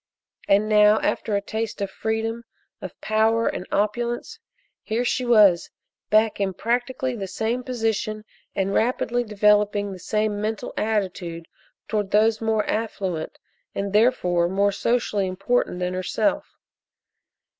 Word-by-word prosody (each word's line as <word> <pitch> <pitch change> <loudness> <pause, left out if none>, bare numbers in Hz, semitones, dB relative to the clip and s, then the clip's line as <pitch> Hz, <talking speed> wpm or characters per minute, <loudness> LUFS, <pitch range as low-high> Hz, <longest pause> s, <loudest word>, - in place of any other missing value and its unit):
And 205 +2 +3
now 210 0 +5
after 215 - -1
a 200 - +1
taste 220 +1 -4
of 200 -1 -3
freedom, 225 +2 -2 0.4
of - - -8
power 220 +1 +2
and 180 - -3
opulence, 235 +4 -1 0.4
here 235 +2 -2
she 250 +1 0
was 205 -7 +5 0.4
back 215 0 +3
in 195 -2 -1
practically 250 +3 -1
the 195 -4 -5
same 225 +6 -2
position 220 -3 -2 0.3
and 195 0 0
rapidly 245 +1 +1
developing 210 -1 +2
the 185 - -8
same 210 +2 -1
mental 215 +1 -3
attitude 185 -6 -2 0.4
towards 210 -3 -1
those 220 +2 +3
more 220 -1 +1
affluent 190 -7 -3 0.4
and, 200 0 -3
therefore, 180 -7 +3
more 200 +2 +2
socially 205 -2 0
important 195 +2 0
than 180 0 -2
herself. 185 +11 0
215 Hz, 130 wpm, -23 LUFS, 200-225 Hz, 0.4 s, now